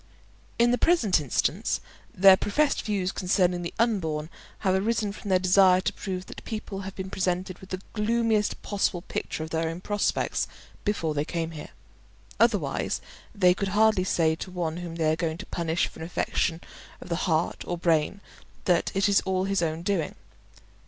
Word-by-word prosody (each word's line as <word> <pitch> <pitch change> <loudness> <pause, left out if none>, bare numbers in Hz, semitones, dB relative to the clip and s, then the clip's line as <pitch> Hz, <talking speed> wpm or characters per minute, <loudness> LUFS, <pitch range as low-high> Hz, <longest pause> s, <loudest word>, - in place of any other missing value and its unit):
In 235 +1 +4
the 245 - +1
present 225 - +3
instance 140 - 0 0.3
their 190 +1 +7
professed 280 +10 +1
views 195 -3 -1
concerning 180 -2 +1
the 170 - -4
unborn 165 -9 0 0.3
have 190 - +2
arisen 210 +2 +1
from 205 0 -8
their 185 - +5
desire 185 0 +5
to 185 - -1
prove 185 -2 -5
that - - -10
people 215 -3 -5
have 195 0 -7
been 190 0 -6
presented 185 0 -1
with 190 - -13
the 185 0 -4
gloomiest 220 -1 +1
possible 195 -3 -1
picture 160 - -4
of 160 - -8
their 160 0 0
own 165 +1 -5
prospects 205 +2 0 0.4
before 170 -7 0
they 145 0 0
came 165 +1 -3
here; 155 -2 -8 0.7
otherwise, - - +1 0.4
they 180 -3 +5
could 195 +2 -2
hardly 220 -3 +4
say 165 -3 +2
to 170 +3 -6
one 170 -3 -3
whom 175 -2 -6
they 160 -2 +2
are - - +1
going 165 -1 -2
to - - -8
punish 170 0 0
for - - -11
an 160 - -5
affection 170 -1 -1 0.4
of - - -10
the 170 +2 -1
heart 160 +1 0
or 175 - -2
brain 170 +3 +1 0.4
that 175 -2 +2
it 195 +1 +3
is 200 -1 +4
all 185 -1 0
his 195 0 0
own 165 0 -1
doing. 180 -5 -1
185 Hz, 180 wpm, -27 LUFS, 165-200 Hz, 0.7 s, their